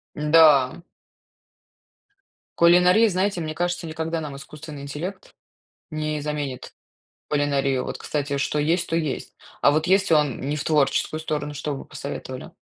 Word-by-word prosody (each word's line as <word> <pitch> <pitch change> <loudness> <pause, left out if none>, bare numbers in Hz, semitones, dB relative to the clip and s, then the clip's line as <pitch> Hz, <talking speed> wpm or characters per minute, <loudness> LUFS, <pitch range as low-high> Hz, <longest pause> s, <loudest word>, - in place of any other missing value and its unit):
Да. 150 -2 +5 1.8
Кулинария, 180 +6 +6
знаете, 185 -1 0
мне 155 0 -4
кажется, 175 +1 -2
никогда 160 0 -3
нам 145 -2 -6
искусственный 145 +1 -10
интеллект 175 +8 -6 0.6
не 155 -1 -3
заменит 145 -3 -4 0.6
кулинарию, 140 -3 +1
вот, - - -5
кстати, 145 -1 -2
что 150 - -1
есть, 165 +4 +1
то 165 - 0
есть. 155 -5 -3 0.3
А - - +5
вот 155 +2 +1
если 190 -2 +3
он 150 -5 +1
не 145 +3 -2
в 140 - -4
творческую 155 +1 +1
сторону, 150 -2 -3
что 145 +1 -4
б - - -6
вы - - -9
посоветовали? - - -7
155 Hz, 140 wpm, -24 LUFS, 145-165 Hz, 1.8 s, Кулинария